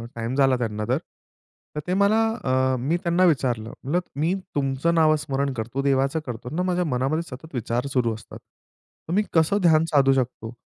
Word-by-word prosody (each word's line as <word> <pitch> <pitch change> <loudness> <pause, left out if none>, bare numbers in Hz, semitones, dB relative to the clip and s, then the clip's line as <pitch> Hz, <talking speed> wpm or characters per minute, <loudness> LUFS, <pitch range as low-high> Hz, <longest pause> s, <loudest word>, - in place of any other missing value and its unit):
Time 115 +3 -3
झाला 135 -2 +3
त्यांना 105 -3 -3
तर. 130 - +3 0.8
तर 150 - -2
ते 180 - 0
मला 210 +2 +4 0.3
अ, 130 0 +2
मी 150 +7 0
त्यांना 170 +2 +2
विचारलं 125 -9 +1
म्हणलं, 160 +7 +1 0.2
"मी 160 +6 +1 0.2
तुमचं 140 +4 0
नाव 155 -1 +5
स्मरण 140 -1 -1
करतो 120 +3 -3
देवाचं 135 +2 +1
करतो 125 0 -6
ना 180 - 0
माझ्या 180 -1 0
मनामध्ये 135 +4 0
सतत 155 +1 -13
विचार 120 +2 -2
सुरू 120 -3 +1
असतात. 110 - -11 0.7
तर 165 - -3
मी 210 +3 +3
कसं 160 +5 +3
ध्यान 160 -2 +4
साधू 135 -2 +4
शकतो?" 125 -3 -2
135 Hz, 180 wpm, -24 LUFS, 125-160 Hz, 0.8 s, नाव